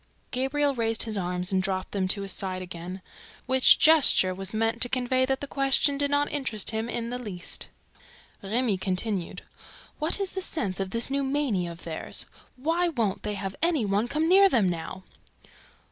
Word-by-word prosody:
Gabriel 280 +3 0
raised 225 -2 +2
his 220 -2 -3
arms 180 -1 -2
and 190 -1 +2
dropped 185 0 -3
them 190 -2 -1
to 200 +1 +1
his 195 - 0
sides 185 0 -3
again, 180 +1 -8 0.4
which 260 0 +6
gesture 300 -12 +6
was 190 +1 -2
meant 225 +1 -1
to 245 - +2
convey 255 +1 +1
that 265 0 -1
the 285 - -4
question 275 +1 +2
did 285 0 0
not 285 0 +1
interest 265 -8 0
him 220 +1 -3
in 235 0 -4
the 250 - -4
least. 195 -8 -3 0.7
Remy 215 0 -1
continued: 190 0 -3 0.6
"What 310 +6 0
is 390 -2 -2
the 380 - -4
sense 200 - -3
of 195 -1 -2
this 230 +6 -2
new 280 0 0
mania 265 -11 -1
of 170 0 -12
theirs? 160 -2 -2 0.3
WHY 330 +7 0
WON'T 225 - -2
THEY 210 -1 -4
HAVE 195 -1 -5
ANY 325 -8 +2
ONE 205 +3 0
COME 305 +5 0
NEAR 390 +2 +6
THEM 220 - +2
NOW?" 175 +2 -6
225 Hz, 185 wpm, -26 LUFS, 190-275 Hz, 0.7 s, which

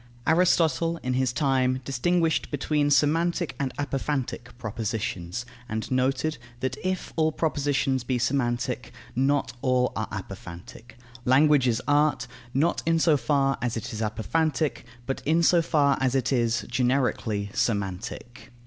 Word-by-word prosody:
Aristotle, 165 -2 +3
in 125 0 -1
his 130 -1 +1
time, 130 -1 +1
distinguished 165 +5 +1
between 145 0 0
semantic 165 +4 +2
and 135 -2 -1
apophantic 135 -3 -2
propositions, 110 -2 -3 0.2
and 110 +2 -4
noted, 130 +3 0 0.2
that 130 +1 -2
if 185 0 -2
all 160 -1 +2
propositions 145 -4 0
be 125 0 0
semantic, 120 -1 -1 0.2
not 135 0 +1
all 125 -1 +2
are - - -2
apophantic. 90 +7 -9 0.3
Language 135 +1 +4
is 120 0 0
art, 145 -2 +3 0.3
not 150 +7 +1
in 165 0 +4
so 160 -1 +4
far 135 -1 +1
as 120 -2 -1
it 115 - -5
is 110 - -4
apophantic, 150 +8 -1 0.2
but 135 +1 -3
in 165 +4 +2
so 170 +1 +5
far 145 -4 +2
as 130 0 +1
it 135 0 +1
is, 120 -2 +1
generically, 120 -5 0
semantic. 110 +4 -3
135 Hz, 135 wpm, -26 LUFS, 120-150 Hz, 0.3 s, so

